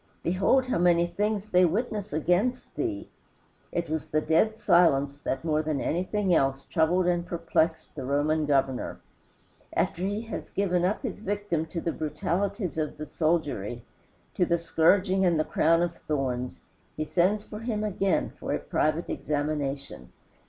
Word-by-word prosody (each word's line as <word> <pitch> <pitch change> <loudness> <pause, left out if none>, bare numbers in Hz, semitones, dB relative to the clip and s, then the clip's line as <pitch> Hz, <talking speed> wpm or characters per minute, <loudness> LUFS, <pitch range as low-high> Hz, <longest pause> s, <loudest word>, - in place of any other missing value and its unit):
Behold 195 +9 +3
how 255 -8 0
many 175 -1 +4
things 210 +3 -2
they 180 -1 +5
witness 205 +3 0
against 180 - 0
thee." 330 -4 -3 0.6
It 170 -1 -2
was 155 0 -3
the 155 - +1
dead 215 +8 +2
silence 155 -9 +4
that 135 0 -3
more 155 -1 +2
than 155 -2 -1
anything 185 +4 0
else 135 -3 +2
troubled 175 +2 +2
and 175 -1 +1
perplexed 165 -2 -1
the 140 - -6
Roman 145 +3 +1
governor. 135 -3 0 0.7
After 170 - 0
he 200 +3 -1
has 225 - -6
given 180 -3 +1
up 200 +8 -1
his 230 -7 -4
victim 205 -6 -2
to 170 - -4
the 165 - -1
brutalities 170 +4 -2
of 155 -1 -3
the 155 - -5
soldiery, 145 - -1 0.5
to - - +1
the 170 0 +2
scourging 185 +4 +3
and 170 -4 +3
the - - +3
crown 165 +2 +3
of 170 -1 -2
thorns, 130 -4 -2 0.4
he 155 - -1
sends 190 +6 +2
for 210 -1 -8
him 225 -2 -2
again 195 -2 0
for - - -5
a - - 0
private 155 +2 0
examination. 145 - -3
170 Hz, 160 wpm, -27 LUFS, 155-195 Hz, 0.7 s, they